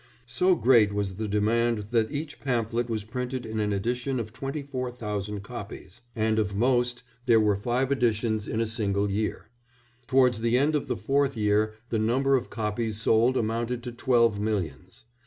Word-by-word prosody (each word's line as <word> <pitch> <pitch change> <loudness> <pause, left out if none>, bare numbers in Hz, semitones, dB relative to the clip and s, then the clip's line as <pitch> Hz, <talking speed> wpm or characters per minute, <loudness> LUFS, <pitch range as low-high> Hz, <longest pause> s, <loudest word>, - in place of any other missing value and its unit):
So 180 +10 +3
great 115 -8 +4
was 100 -2 -2
the 110 0 -2
demand 105 +1 +1
that 115 -1 +2
each 150 0 -5
pamphlet 120 -2 -1
was 110 -2 -2
printed 125 +3 -4
in 110 0 -4
an 105 -1 0
edition 120 +6 -1
of 110 -2 -5
twenty 135 +5 -4
four 130 -3 -4
thousand 105 -4 -4
copies, 100 - -9
and 110 -1 +1
of 100 -2 -1
most 125 +2 +1 0.2
there 115 -2 +6
were 105 -2 +3
five 125 +6 -1
editions 110 -4 0
in 110 - -2
a 115 - +2
single 105 -3 0
year; 105 +1 -3 0.6
towards 125 -4 +3
the 115 +1 +3
end 145 +4 +2
of 150 - -1
the - - -2
fourth 140 -2 0
year 105 0 +1
the 110 - 0
number 130 +5 +2
of 125 -2 -1
copies 110 0 -2
sold 115 +3 +3
amounted 115 +2 -1
to 125 - -5
twelve 115 -3 +2
millions. 100 - -4
115 Hz, 175 wpm, -27 LUFS, 105-125 Hz, 0.6 s, there